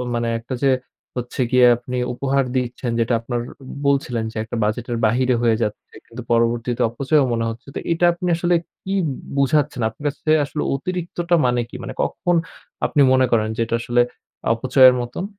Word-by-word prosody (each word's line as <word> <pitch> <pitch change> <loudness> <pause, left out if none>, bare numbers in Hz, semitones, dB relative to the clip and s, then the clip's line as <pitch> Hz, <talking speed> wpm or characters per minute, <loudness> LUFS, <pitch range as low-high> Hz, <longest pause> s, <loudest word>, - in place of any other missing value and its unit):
মানে 115 0 -1
একটা 120 +3 -6
যে 135 - +5 0.5
হচ্ছে 120 +2 -5
গিয়ে 125 -1 +6
আপনি 125 +1 -6 0.2
উপহার 135 +1 +1
দিচ্ছেন, 125 0 -2
যেটা 115 +1 +1
আপনার 120 +1 -3 0.5
বলছিলেন 125 -5 +1
যে - - -16
একটা 115 +2 -6
বাজেটের 120 +3 -2
বাহিরে 125 +3 +2
হয়ে 115 -2 +3
যাচ্ছে, 105 - -4
কিন্তু 120 +2 -9
পরবর্তীতে 115 +1 +1
অপচয়ও 140 +4 +2
মনে 115 -1 0
হচ্ছে। 115 +3 -10
তো - - -3
এটা 170 +1 +1
আপনি 175 +1 -4
আসলে 175 +1 +1 0.3
কি 195 - -3 0.2
ব - - -1 0.3
বুঝাচ্ছেন? 140 -1 +1
আপনার 150 - -14
কাছে 145 +2 -3
আসলে 150 +1 -4
অতিরিক্তটা 175 +2 -2
মানে 125 0 +1
কি? - - -14
মানে - - -6
কখন 175 0 0 0.5
আপনি 150 - +1
মনে 130 0 +4
করেন 110 -2 +3
যে - - -3
এটা 115 - -3
আসলে 120 +1 +2 0.5
অপচয়ের 130 +2 +5
মতন? 120 +9 -4
125 Hz, 175 wpm, -21 LUFS, 120-140 Hz, 0.5 s, গিয়ে